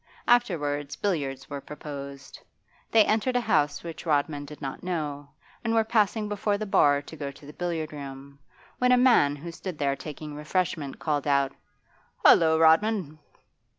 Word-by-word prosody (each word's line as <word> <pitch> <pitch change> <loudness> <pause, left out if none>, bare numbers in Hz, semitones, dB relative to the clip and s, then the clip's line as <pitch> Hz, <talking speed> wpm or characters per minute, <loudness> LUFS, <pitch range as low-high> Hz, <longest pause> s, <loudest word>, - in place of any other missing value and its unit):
Afterwards 145 - +1
billiards 140 -9 -2
were 140 -1 -6
proposed. 140 -2 -9 0.5
They 220 -2 +5
entered 225 +4 +1
a 245 - +3
house 145 -10 +1
which 165 -1 -7
Rodman 145 -2 0
did 150 +1 -11
not 135 -2 -6
know, 150 -5 -4 0.3
and 230 -1 0
were 225 - +4
passing 215 -1 +1
before 205 0 -1
the 215 - -4
bar 145 -7 +3
to 160 - -11
go 145 -2 -5
to 140 +1 -14
the 150 - -10
billiard 165 -3 -3
room, 140 -1 -9 0.4
when 250 0 +3
a 250 - +6
man 240 - +5
who 165 +4 -8
stood 180 0 -7
there 140 -1 0
taking 150 +1 -8
refreshment 150 -1 -2
called 150 -2 -1
out, 140 -1 +2 0.7
'Hollo, 160 -1 +7
Rodman! 160 0 +3
155 Hz, 160 wpm, -27 LUFS, 145-200 Hz, 0.7 s, Hollo